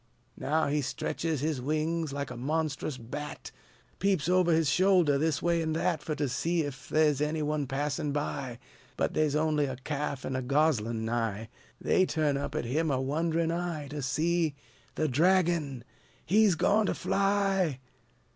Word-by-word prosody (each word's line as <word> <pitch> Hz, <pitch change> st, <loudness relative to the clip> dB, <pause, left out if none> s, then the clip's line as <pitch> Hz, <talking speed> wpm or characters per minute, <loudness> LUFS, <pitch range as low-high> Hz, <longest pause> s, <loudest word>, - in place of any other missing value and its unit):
Now 160 Hz, +2 st, +1 dB
he 145 Hz, +1 st, 0 dB
stretches 155 Hz, +1 st, -2 dB
his 150 Hz, -3 st, -1 dB
wings, 155 Hz, +3 st, -1 dB
like 140 Hz, 0 st, -4 dB
a -, -, -6 dB
monstrous 150 Hz, +1 st, -2 dB
bat, 145 Hz, +5 st, -7 dB, 0.5 s
Peeps 190 Hz, -5 st, +1 dB
over 180 Hz, -1 st, +3 dB
his 160 Hz, -1 st, +3 dB
shoulder, 180 Hz, -5 st, +4 dB
this 155 Hz, -1 st, 0 dB
way 170 Hz, -1 st, +2 dB
an' 160 Hz, -1 st, -1 dB
that, 165 Hz, -1 st, 0 dB
Fur 155 Hz, -, -3 dB
to 145 Hz, -1 st, -1 dB
see 160 Hz, +5 st, 0 dB
'f 135 Hz, -2 st, -8 dB
the 155 Hz, -1 st, +4 dB
's 140 Hz, -, -5 dB
any 155 Hz, +1 st, 0 dB
one 150 Hz, -2 st, -1 dB
passin' 145 Hz, +2 st, -2 dB
by; 140 Hz, -4 st, -3 dB, 0.4 s
But -, -, 0 dB
the' 155 Hz, -1 st, +2 dB
's 145 Hz, -, -2 dB
on'y 150 Hz, -1 st, +2 dB
a 130 Hz, -1 st, -4 dB
ca'f 140 Hz, +1 st, -4 dB
an' 130 Hz, -, -3 dB
a 130 Hz, -, -1 dB
goslin' 125 Hz, -5 st, +1 dB
nigh. 115 Hz, -2 st, -2 dB, 0.3 s
They 185 Hz, -, +2 dB
turn 150 Hz, -3 st, +1 dB
up 140 Hz, +1 st, -3 dB
at 155 Hz, -, -1 dB
him 155 Hz, +7 st, 0 dB
a 135 Hz, -2 st, +1 dB
wonderin' 160 Hz, +4 st, 0 dB
eye, 170 Hz, -4 st, -3 dB
To 145 Hz, 0 st, -5 dB
see 160 Hz, +3 st, 0 dB, 0.4 s
The 155 Hz, -, +1 dB
dragon! 160 Hz, -3 st, +2 dB, 0.4 s
he's 205 Hz, 0 st, +4 dB
goin' 210 Hz, +6 st, +3 dB
to -, -, 0 dB
fly! 195 Hz, -6 st, +1 dB
150 Hz, 175 wpm, -29 LUFS, 140-165 Hz, 0.5 s, shoulder